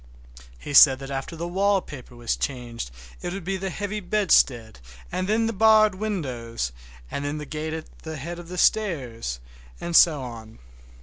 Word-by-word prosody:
He 145 - -7
said 135 -1 +9
that 135 +1 -8
after 135 +4 -4
the 170 +1 -4
wallpaper 180 -9 -1
was 120 -1 -1
changed 120 - -4 0.3
it 175 - -4
would 195 -2 -5
be 195 +3 -2
the 190 0 -3
heavy 205 +3 -4
bedstead, 165 - +2 0.3
and 185 +1 -2
then 225 +1 +2
the 225 - -1
barred 215 0 +5
windows, 130 - -3 0.4
and 140 - -3
then 145 +1 -2
that 150 -2 -8
gate 155 0 -3
at 160 -1 -8
the 160 -1 -7
head 170 +5 -6
of 175 - -10
the 180 +1 -7
stairs, 130 - 0 0.4
and 170 -1 -3
so 155 -6 +6
on. 115 -2 -9
160 Hz, 175 wpm, -25 LUFS, 125-195 Hz, 0.4 s, said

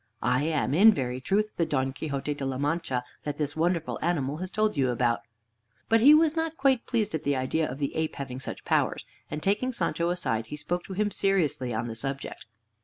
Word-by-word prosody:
I 125 +4 +2
am 150 -4 0
in 205 +8 +8
very 125 -2 -2
truth 210 +9 0
the 170 - +2
Don 135 -3 0
Quixote 145 0 -3
de 145 - -7
la 135 -1 -2
Mancha 145 -3 -1 0.2
that 150 - -4
this 150 -1 -2
wonderful 170 0 0
animal 150 -4 0
has 185 +2 -4
told 215 +2 +1
you 135 -3 +2
about." 120 -1 +1 0.7
But 225 - +5
he 285 +6 +8
was 315 0 +4
not 325 0 -2
quite 270 -3 +2
pleased 220 -4 0
at 160 - -2
the 140 0 +1
idea 130 +5 0
of 130 - -5
the 140 -1 -2
ape 160 0 -1
having 130 -2 -5
such 135 - -6
powers, - - +1 0.2
and 150 0 -5
taking 210 +6 +1
Sancho 170 -7 -1
aside 115 -11 -1
he 150 - -6
spoke 175 +4 -3
to 195 - -7
him 210 +2 0
seriously 170 -12 +1
on 115 +1 -2
the 115 - -4
subject. 135 +4 -4
155 Hz, 215 wpm, -27 LUFS, 135-195 Hz, 0.7 s, in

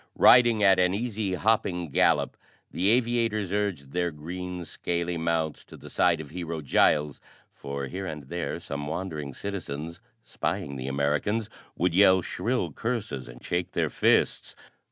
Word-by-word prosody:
Riding 120 -4 +6
at 95 -2 +6
an 90 +1 +3
easy 105 -4 -2
hopping 90 -6 0
gallop, - - +2 0.4
the 95 +3 +1
aviators 115 -4 +1
urged 95 -10 -2
their 90 +1 0
green, 90 +3 -6
scaly 85 +1 -2
mounts 80 -2 -1
to - - -13
the - - -12
side 85 -3 +3
of 75 -3 -8
Hero 85 -2 -4
Giles, 75 +1 +2 0.3
for 70 0 -5
here 95 +7 -5
and 75 -4 -6
there 85 +6 -4
some 75 +1 -5
wandering 80 -3 -4
citizens, 85 -5 -5 0.2
spying 70 - -3
the 65 0 -5
Americans, 75 +11 0 0.3
would 90 -1 +1
yell 95 -1 +6
shrill - - -2
curses 110 - -3
and - - -13
shake 90 +1 -2
their - - 0
fists. - - +2
90 Hz, 150 wpm, -27 LUFS, 75-100 Hz, 0.4 s, Riding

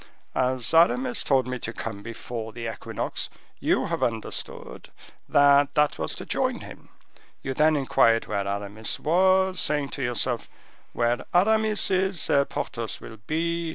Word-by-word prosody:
As 130 0 0
Aramis 240 +10 +4
told 135 -3 +2
me 125 0 -4
to 110 - -4
come 110 -3 -6
before 115 +1 -6
the 115 -1 -5
equinox, 110 - -4 0.3
you - - +1
have - - -3
understood 115 -2 -4 0.4
that 145 0 +5
that 150 0 +2
was - - -2
to - - -8
join - - -1
him. - - -12 0.5
You 135 - -2
then 155 +3 +3
inquired 130 -5 +3
where 100 -2 -2
Aramis 100 +2 -3
was, 185 +3 +3
saying 145 -2 0
to 140 - -5
yourself, 120 -1 -1 0.4
'Where 120 0 0
Aramis 215 +2 +3
is, 190 -2 +1
there 140 0 +3
Porthos 115 -5 -5
will 110 - -10
be. 170 +1 -1
135 Hz, 150 wpm, -25 LUFS, 115-170 Hz, 0.5 s, that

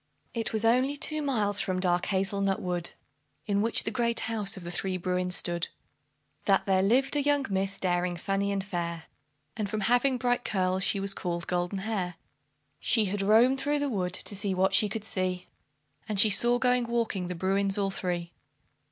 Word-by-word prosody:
It 225 -2 -2
was 220 0 -1
only 255 +5 +2
two 310 +1 -1
miles 215 -8 +2
from 185 -3 -1
dark 180 -1 +1
Hazel 195 +1 0
nut 195 -1 +1
Wood, 175 -1 -2 0.6
In 200 -1 +1
which 225 +2 +3
the 220 - -2
great 235 0 +1
house 215 -3 -2
of 185 - -9
the 175 - -6
three 185 +1 -1
Bruins 180 0 -1
stood, 170 -1 -1 0.8
That 195 -1 +3
there 190 -1 +2
lived 255 +8 +2
a 290 - +2
young 285 -1 +2
miss, 195 0 -1
daring, 175 -1 -1
funny, 195 +3 -1
and 195 -1 -1
fair, 170 -3 -4 0.5
And 210 -2 -3
from 215 0 -2
having 245 +5 +2
bright 245 0 0
curls, 185 -1 0
she 200 - +1
was 195 0 +1
called 170 -3 -3
Goldenhair. 180 +1 -2 0.6
She 220 -3 +2
had 200 +1 -2
roamed 230 +6 +4
through 290 +2 0
the 285 -1 -1
wood 180 -6 -2
to 205 - -4
see 200 -1 0
what 190 +1 +2
she 210 - +4
could 215 +1 -4
see, 185 -3 -2 0.6
And 210 -2 0
she 215 +1 +7
saw 240 +4 +5
going 250 -1 +2
walking 230 -6 -1
the 180 - -4
Bruins 195 +3 0
all 195 -1 0
three. 175 -2 -3
195 Hz, 190 wpm, -28 LUFS, 185-230 Hz, 0.8 s, she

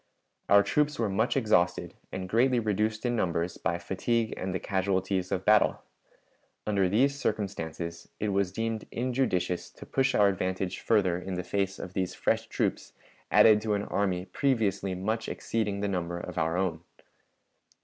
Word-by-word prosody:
Our 100 0 +7
troops 150 +4 +1
were 115 -3 0
much 110 +7 +1
exhausted, 90 -8 +2 0.2
and 95 0 -4
greatly 120 +5 +3
reduced 110 +1 -1
in 120 0 +1
numbers 85 -4 -1
by 85 - 0
fatigue 110 +6 -1
and 95 - -3
the 95 - -2
casualties 95 -1 -1
of 95 - -1
battle. 105 -1 +4 0.8
Under 100 -3 +2
these 135 +8 +2
circumstances 85 - -3
it 105 - -1
was 100 -2 +1
deemed 115 +1 -3
injudicious 120 -8 -1
to - - -12
push 135 0 +1
our 105 -1 +5
advantage 95 -1 -1
further 95 -6 +2
in 95 0 -5
the 90 - -3
face 95 +1 -1
of 90 - -7
these 95 -2 -2
fresh - - 0
troops - - -2 0.4
added 105 -1 +6
to 105 -1 0
an 100 - -1
army 95 -3 -1
previously 100 -4 0
much 110 +5 -2
exceeding 105 -3 -2
the 100 - 0
number 85 -3 -2
of 85 - -7
our 80 +2 0
own. 90 -4 -1
100 Hz, 160 wpm, -28 LUFS, 90-110 Hz, 0.8 s, Our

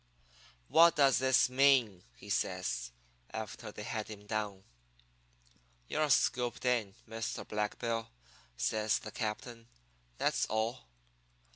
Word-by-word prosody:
"'What 170 +1 +6
does 140 -3 +5
this 130 -1 +4
mean?' 125 -8 +3
he 100 - -14
says, 90 -12 -1 0.4
after - - -6
they - - -8
had 110 -2 -3
him 105 -1 -10
down. 105 -3 -3 1.2
"'You're 155 - 0
scooped 125 -2 +1
in, 115 -6 +1
Mr. 115 -1 -4
Black 105 0 -2
Bill,' 115 -1 -2 0.5
says 105 - +1
the 110 - -8
captain. 115 +1 -5 0.5
'That's - - +1
all.' 115 +3 -2
110 Hz, 115 wpm, -33 LUFS, 105-125 Hz, 1.2 s, What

